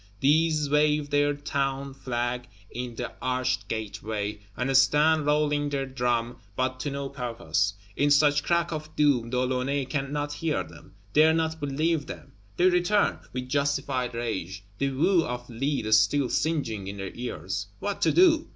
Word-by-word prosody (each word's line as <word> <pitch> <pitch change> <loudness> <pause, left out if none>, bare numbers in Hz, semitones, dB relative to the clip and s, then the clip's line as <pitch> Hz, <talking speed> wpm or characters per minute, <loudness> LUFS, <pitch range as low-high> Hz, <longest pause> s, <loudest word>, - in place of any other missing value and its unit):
These 155 +1 +3
wave 150 0 +2
their 145 0 +2
Town 140 -1 -2
flag 125 -1 -3 0.2
in 120 -1 -5
the 120 +1 -5
arched 130 -3 -1
Gateway, 105 -1 -4 0.2
and 135 +2 0
stand, 150 +3 +4
rolling 150 -1 +2
their 140 -1 -1
drum, 120 -2 -1 0.2
but 130 +1 -1
to 145 - -2
no 140 0 -4
purpose. 115 - -1 0.2
In 145 - +2
such 145 0 +4
Crack 170 +2 +1
of 155 -1 -6
Doom, 140 -6 +2
De 125 - -1
Launay 130 +2 0
cannot 145 +2 -2
hear 155 0 -1
them, - - -15 0.2
dare 160 +1 +5
not 160 0 -1
believe 150 +2 0
them; - - -9 0.3
they 175 - +3
return, 185 +3 +2
with 125 0 -4
justified 135 -3 -1
rage, 100 -5 -4 0.2
the 140 - +1
whew 165 +6 +3
of 125 -1 -5
lead 120 -2 -1
still 110 +5 +4
singing 115 -11 -1
in 100 +1 -6
their 95 -1 -5
ears. 100 -4 -4
What 205 -1 -4
to - - +4
do? 335 -3 +4
135 Hz, 160 wpm, -27 LUFS, 120-150 Hz, 0.3 s, dare